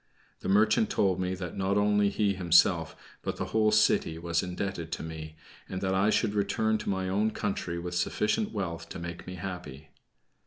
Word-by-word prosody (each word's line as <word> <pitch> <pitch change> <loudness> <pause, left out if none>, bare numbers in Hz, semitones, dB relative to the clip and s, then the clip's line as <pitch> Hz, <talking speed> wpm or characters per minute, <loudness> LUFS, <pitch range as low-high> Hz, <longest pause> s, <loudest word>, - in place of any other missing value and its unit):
The - - -4
merchant 110 - +4
told 95 - +1
me 90 0 -1
that 90 -2 -6
not 100 +1 0
only 105 0 +3
he 100 0 +1
himself, 85 -2 +3 0.3
but - - -3
the - - -2
whole 110 -1 +4
city, 105 -6 +3
was 85 0 0
indebted 90 -2 -4
to - - -4
me, 80 -1 -7 0.3
and 95 - -3
that 95 0 0
I 95 +2 +3
should 105 - +2
return 110 +2 +1
to - - -4
my 95 -1 -1
own 100 +4 +1
country 95 -5 -3
with 90 +1 -5
sufficient 105 - 0
wealth 90 -6 -4
to - - -6
make 85 0 -7
me 90 - -6
happy. 90 -6 -7
95 Hz, 190 wpm, -29 LUFS, 85-105 Hz, 0.3 s, merchant